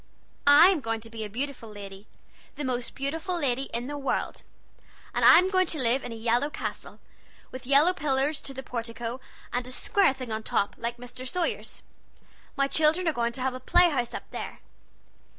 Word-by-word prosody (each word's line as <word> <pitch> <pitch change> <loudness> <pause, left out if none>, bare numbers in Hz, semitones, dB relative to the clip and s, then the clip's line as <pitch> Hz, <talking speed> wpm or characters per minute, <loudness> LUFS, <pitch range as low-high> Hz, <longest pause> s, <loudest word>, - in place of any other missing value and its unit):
I'm 335 +5 +7
going 225 -4 -2
to 225 +1 -10
be 225 -1 -5
a 210 - -5
beautiful 250 0 -5
lady 200 -1 -10 0.5
the 295 - -4
most 245 -2 -3
beautiful 320 +6 -2
lady 270 -2 0
in 235 +1 -3
the 290 +2 -5
world! 275 - -2 0.7
And - - 0
I'm 365 +3 +7
going 370 -2 +3
to 320 - -2
live 255 +1 +2
in 245 - -6
a - - -6
yellow 235 +5 +1
castle, - - -6 0.5
with 255 -1 -9
yellow 290 +6 +5
pillars 280 -1 0
to 275 - -6
the 265 - -6
portico, 235 0 -5 0.3
and 245 0 -1
a - - -4
square 390 +4 +2
thing 255 -3 -7
on 220 0 -2
top, 200 -2 0
like 235 +1 -3
Mr. 245 +1 -8
Sawyer's. 355 +2 -2 0.7
My 275 -1 +2
children 315 +5 +3
are 320 - +2
going 235 -2 0
to 255 - -6
have 260 0 0
a 255 - -6
play 350 +5 +4
house 245 -5 -2
up - - -7
there. - - -6
260 Hz, 190 wpm, -27 LUFS, 235-295 Hz, 0.7 s, I'm